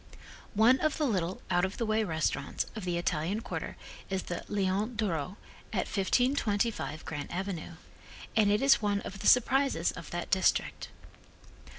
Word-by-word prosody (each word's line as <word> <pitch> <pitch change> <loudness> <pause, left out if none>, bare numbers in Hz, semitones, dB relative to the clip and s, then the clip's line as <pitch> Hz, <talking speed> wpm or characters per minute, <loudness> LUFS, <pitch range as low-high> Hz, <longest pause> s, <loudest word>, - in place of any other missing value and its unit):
One 235 +5 +6
of 310 -1 +1
the 305 - +1
little, 185 -7 -1
out 175 0 +3
of 190 +2 -1
the 230 - -1
way 215 0 +2
restaurants 160 -5 -1
of 215 -4 -5
the 175 -1 0
Italian 175 +4 -1
quarter - - -5 0.3
is 190 -1 -1
the 175 - -5
Leon 205 +3 0
d'Oro, 185 -4 -2 0.3
at - - 0
1525 220 - 0
Grant 150 -3 -5
avenue, 180 -2 -4 0.6
and 215 -2 +4
it 210 +5 +2
is 275 -3 +6
one 205 -1 +1
of 195 - -7
the - - -1
surprises 250 -7 +4
of 165 - -9
that 175 0 -4
district. 190 -1 +1
200 Hz, 160 wpm, -30 LUFS, 175-225 Hz, 0.6 s, One